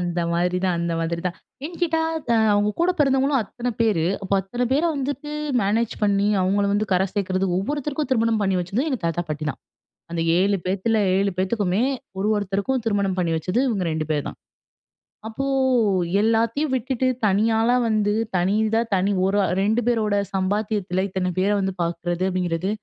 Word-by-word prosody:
அந்த 175 Hz, -1 st, -2 dB
மாதிரி 180 Hz, +1 st, +1 dB
தான் 180 Hz, -2 st, +1 dB
அந்த 170 Hz, 0 st, -1 dB
மாதிரி 170 Hz, +1 st, -2 dB
தான். 180 Hz, -, -3 dB, 0.3 s
ஏன் 340 Hz, +1 st, -9 dB
கேட்டா 325 Hz, -1 st, +2 dB, 0.5 s
அவங்க 205 Hz, +1 st, +2 dB
கூட 355 Hz, +2 st, +3 dB
பெறந்தவங்களும் 270 Hz, -1 st, +3 dB
அத்தன 240 Hz, +4 st, -5 dB
பேரு. 205 Hz, -8 st, +2 dB, 0.2 s
அப்போ 195 Hz, +1 st, -1 dB
அத்தன 240 Hz, +6 st, -4 dB
பேர 290 Hz, -, +2 dB
வந்துட்டு 285 Hz, +2 st, -4 dB, 0.3 s
மேனேஜ் 215 Hz, +3 st, +1 dB
பண்ணி 200 Hz, 0 st, +2 dB
அவுங்கள 195 Hz, +2 st, +1 dB
வந்து 210 Hz, +1 st, +1 dB
கரை 185 Hz, +1 st, +3 dB
சேக்கிறது. 190 Hz, -1 st, -1 dB
ஒவ்வொருத்தருக்கும் 290 Hz, +7 st, -2 dB
திருமணம் 225 Hz, -3 st, +2 dB
பண்ணி 195 Hz, -1 st, +1 dB
வெச்சதும், 200 Hz, -, -2 dB
எங்க 260 Hz, -5 st, -1 dB
தாத்தா, 170 Hz, +1 st, 0 dB
பாட்டி 155 Hz, 0 st, -4 dB
தான். -, -, -10 dB, 0.5 s
அந்த 170 Hz, -1 st, -2 dB, 0.2 s
7 200 Hz, +2 st, +2 dB
பேத்துல, 200 Hz, +4 st, 0 dB, 0.2 s
7 200 Hz, 0 st, +1 dB
பேத்துக்குமே 190 Hz, +2 st, 0 dB, 0.4 s
ஒரு 205 Hz, -, 0 dB
ஒருத்தருக்கும் 205 Hz, +6 st, -1 dB
திருமணம் 200 Hz, -3 st, 0 dB
பண்ணி 170 Hz, -2 st, 0 dB
வச்சது 180 Hz, +9 st, -1 dB
இவங்க 200 Hz, -6 st, -1 dB
2 155 Hz, 0 st, -2 dB
பேரு 150 Hz, -2 st, 0 dB
தான். -, -, -8 dB, 0.9 s
அப்போ 270 Hz, +5 st, -4 dB, 0.8 s
எல்லாத்தியும் 230 Hz, +6 st, +1 dB
விட்டுட்டு 260 Hz, +1 st, -1 dB, 0.2 s
தனியாளா 225 Hz, +4 st, +3 dB
வந்து, 210 Hz, -1 st, +1 dB, 0.2 s
தனி 185 Hz, +4 st, +1 dB
இதா 225 Hz, +1 st, +2 dB
தனி 190 Hz, +2 st, +1 dB
ஒரு 195 Hz, +2 st, +1 dB, 0.2 s
2 220 Hz, +4 st, +2 dB
பேரோட 215 Hz, -4 st, +1 dB, 0.2 s
சம்பாத்தியத்தில 195 Hz, -1 st, -1 dB
இத்தன 185 Hz, -1 st, -1 dB
பேர 195 Hz, +2 st, +2 dB
வந்து 190 Hz, -1 st, -1 dB
பார்க்கிறது 175 Hz, +1 st, -2 dB
அப்படிங்கிறது, 180 Hz, 0 st, -1 dB
200 Hz, 165 wpm, -23 LUFS, 185-230 Hz, 0.9 s, கூட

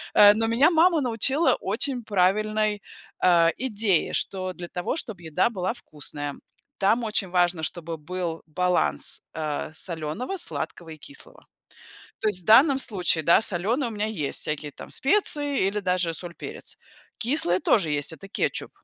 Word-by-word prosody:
Э, 205 Hz, 0 st, +9 dB
но 225 Hz, +1 st, 0 dB
меня 265 Hz, +9 st, +4 dB
мама 335 Hz, 0 st, +4 dB
научила 260 Hz, +6 st, +2 dB
очень 260 Hz, -5 st, -1 dB
правильной, 210 Hz, +1 st, +1 dB, 0.4 s
э, 170 Hz, -2 st, +5 dB
идее, 215 Hz, -8 st, 0 dB
что, 185 Hz, -1 st, -2 dB
для 175 Hz, -1 st, -9 dB
того, 180 Hz, +8 st, -3 dB
чтоб 220 Hz, -, -3 dB
еда 170 Hz, +5 st, 0 dB
была 185 Hz, -2 st, -3 dB
вкусная, 145 Hz, -, -7 dB, 0.4 s
там 220 Hz, +5 st, +2 dB
очень 210 Hz, -3 st, -1 dB
важно, 175 Hz, -2 st, +1 dB
чтобы 165 Hz, 0 st, -4 dB
был 170 Hz, +1 st, -5 dB
баланс, 175 Hz, -, -1 dB
э, 155 Hz, -1 st, -4 dB
солёного, 165 Hz, -, -3 dB
сладкого 170 Hz, -, -4 dB
и 155 Hz, -, -9 dB
кислого. 285 Hz, -, -12 dB, 0.8 s
То 220 Hz, -, +1 dB
есть 185 Hz, -3 st, 0 dB
в -, -, -23 dB
данном 265 Hz, +5 st, +6 dB
случае, 180 Hz, -, 0 dB
да, 170 Hz, -, +5 dB
солёное 225 Hz, -, 0 dB
у -, -, -7 dB
меня 210 Hz, -1 st, -2 dB
есть, 160 Hz, -11 st, -2 dB
всякие 150 Hz, -1 st, -2 dB
там -, -, -11 dB
специи 290 Hz, -, +2 dB
или 205 Hz, +2 st, -1 dB
даже 180 Hz, -3 st, 0 dB
соль, 175 Hz, 0 st, -7 dB
перец. -, -, -7 dB, 0.4 s
Кислые 225 Hz, -, +3 dB
тоже 195 Hz, -8 st, +2 dB
есть- 145 Hz, +2 st, -1 dB
это 160 Hz, +5 st, -11 dB
кетчуп. -, -, -2 dB
185 Hz, 155 wpm, -25 LUFS, 170-230 Hz, 0.8 s, Э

